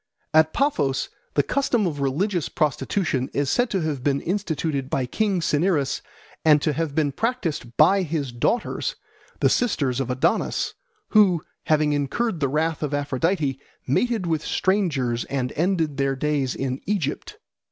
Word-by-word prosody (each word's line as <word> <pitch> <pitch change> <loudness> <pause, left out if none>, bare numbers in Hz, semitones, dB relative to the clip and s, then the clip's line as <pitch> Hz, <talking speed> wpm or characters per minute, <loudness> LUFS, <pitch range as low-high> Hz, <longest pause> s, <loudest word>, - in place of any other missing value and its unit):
At 160 0 +5
Paphos 145 - 0 0.3
the - - +4
custom 245 -6 +1
of 155 -5 -2
religious 170 +6 0
prostitution 150 -2 0
is 140 -1 +1
said 245 0 +2
to 190 - 0
have 150 -5 -2
been 140 -1 +2
instituted 160 -7 -2
by 135 -2 0
King 195 - 0
Cinyras, 150 -2 +1 0.4
and 150 -2 +6
to 155 - +1
have 155 -1 -2
been 150 -3 +2
practised 165 - -2
by 190 +6 +6
his 150 -6 -2
daughters, 240 - -1 0.5
the - - +5
sisters 140 - +1
of 135 -2 -2
Adonis, 125 +1 0 0.4
who, 190 -7 +4 0.2
having 155 -1 +3
incurred 160 - -1
the 140 -3 +1
wrath 155 +2 0
of 150 -1 -1
Aphrodite, 145 0 0 0.3
mated 220 - +1
with 160 -3 0
strangers 145 - 0
and 130 -2 -2
ended 160 -4 0
their 135 -1 +1
days 140 -2 0
in 130 0 -3
Egypt. 185 -9 -2
155 Hz, 150 wpm, -24 LUFS, 135-185 Hz, 0.5 s, and